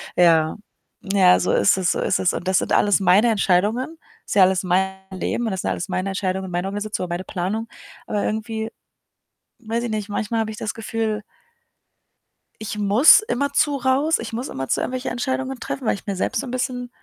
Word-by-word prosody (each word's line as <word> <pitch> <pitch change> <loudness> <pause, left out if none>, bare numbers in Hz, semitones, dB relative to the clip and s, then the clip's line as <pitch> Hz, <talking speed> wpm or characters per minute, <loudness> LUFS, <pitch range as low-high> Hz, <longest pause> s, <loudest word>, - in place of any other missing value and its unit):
Ja, 165 -3 +4 0.6
ja, 185 -2 +6
so - - 0
ist - - +4
es 185 -2 +1
so - - -2
ist - - +1
es. 185 - +2
Und 180 - -5
das 190 0 +3
sind - - -2
alles 205 -1 +4
meine 195 +5 +4
Entscheidungen. 215 - +1 0.3
Ist - - -4
ja 200 - +6
alles 190 0 +2
mein 190 +1 +1
Leben 210 +5 -2
und 220 - -1
das 190 - -3
sind 95 - -1
alles 90 -2 -3
meine 190 +1 -2
Entscheidungen 190 0 -2
und 180 - -8
Meinungen, 190 +4 -2
oder 195 -4 -3
meine 175 +2 -4
Planung, 205 +5 -3 0.4
aber 205 - -1
irgendwie, 220 +1 -3 0.9
weiß 230 0 -3
ich - - -3
nicht, 210 -1 -3
manchmal 220 +2 -1
habe 220 0 -3
ich 215 - -9
das 215 - -3
Gefühl 225 -1 -3 1.4
„ich 210 0 -5
muss 210 - +7
immer 280 - -2
zu 295 -2 +2
raus. 270 +5 +2
Ich 230 -1 -6
muss 245 +4 -4
immerzu 135 0 -2
irgendwelche 255 0 -3
Entscheidungen 260 +1 -2
treffen“, 265 - -5
weil - - +2
ich 200 - -10
mir 200 -2 -2
selbst 205 - -1
so - - -6
'n - - -6
bisschen 250 -1 -3
210 Hz, 205 wpm, -22 LUFS, 190-240 Hz, 1.4 s, muss